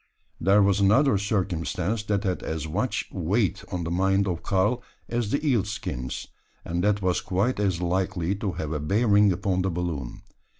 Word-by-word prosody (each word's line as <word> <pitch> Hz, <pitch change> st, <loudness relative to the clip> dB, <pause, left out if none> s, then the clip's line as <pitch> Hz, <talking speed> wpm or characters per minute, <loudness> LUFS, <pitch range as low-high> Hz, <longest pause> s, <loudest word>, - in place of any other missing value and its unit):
There 100 Hz, +4 st, +4 dB
was 100 Hz, 0 st, +3 dB
another 105 Hz, +4 st, +4 dB
circumstance 100 Hz, 0 st, -1 dB
that 105 Hz, -1 st, 0 dB
had 95 Hz, -3 st, -1 dB
as 80 Hz, -1 st, -4 dB
much 105 Hz, +8 st, -1 dB
weight 100 Hz, +2 st, 0 dB
on 90 Hz, -2 st, -2 dB
the 80 Hz, -, -3 dB
mind 95 Hz, +2 st, +2 dB
of 90 Hz, -2 st, -2 dB
Karl 100 Hz, +5 st, +1 dB, 0.3 s
as 120 Hz, -3 st, -1 dB
the 140 Hz, +6 st, -1 dB
eel 120 Hz, -8 st, +3 dB
skins; 75 Hz, -, -5 dB, 0.4 s
and 85 Hz, +1 st, -2 dB
that 105 Hz, -1 st, +1 dB
was 90 Hz, -1 st, +1 dB
quite 100 Hz, +6 st, 0 dB
as 95 Hz, -4 st, 0 dB
likely 90 Hz, 0 st, 0 dB
to 100 Hz, -3 st, -2 dB
have 75 Hz, -1 st, -4 dB
a 75 Hz, -, -1 dB
bearing 105 Hz, +5 st, +3 dB
upon 95 Hz, 0 st, 0 dB
the 95 Hz, -, 0 dB
balloon. 85 Hz, -8 st, -4 dB
95 Hz, 175 wpm, -26 LUFS, 90-105 Hz, 0.4 s, There